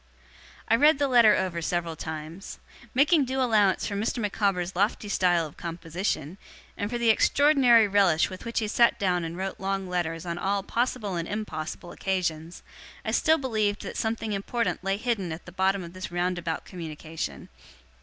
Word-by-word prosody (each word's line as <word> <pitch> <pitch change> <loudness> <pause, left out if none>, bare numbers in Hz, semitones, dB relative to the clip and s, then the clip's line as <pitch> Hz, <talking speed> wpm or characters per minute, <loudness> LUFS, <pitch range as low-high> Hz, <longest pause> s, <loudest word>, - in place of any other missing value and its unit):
I 230 - +4
read 300 +3 +5
the 285 0 +1
letter 235 -5 +6
over 180 -3 -2
several 170 0 -2
times. 160 +4 -7 0.4
Making 295 +3 +4
due 265 +1 -2
allowance 215 -7 +3
for - - -3
Mr. 220 +5 -1
Micawber's 195 -4 -1
lofty 205 +2 0
style 175 -4 +2
of 150 - -11
composition, 170 0 -4 0.4
and 205 - -3
for 240 - -2
the 235 -1 +4
extraordinary 255 -3 +5
relish 195 -5 +3
with 185 - -9
which 230 0 -5
he 220 - +1
sat 235 +2 +3
down 180 -3 0
and 165 +1 -5
wrote 190 0 -4
long 195 0 -2
letters 170 -2 -2
on 170 0 -4
all 195 +1 0
possible 230 -4 -1
and 170 0 -3
impossible 175 -5 -5
occasions, 170 -3 -3 0.4
I - - -1
still 320 0 +3
believed 215 -7 -1
that - - -6
something 220 -1 -2
important 215 +2 -2
lay 195 +1 0
hidden 215 -6 -2
at 160 +2 -7
the 180 - -10
bottom 190 +1 +1
of 170 0 -10
this 185 -1 -7
roundabout 175 -2 -2
communication. 160 - -6
195 Hz, 175 wpm, -27 LUFS, 170-220 Hz, 0.4 s, letter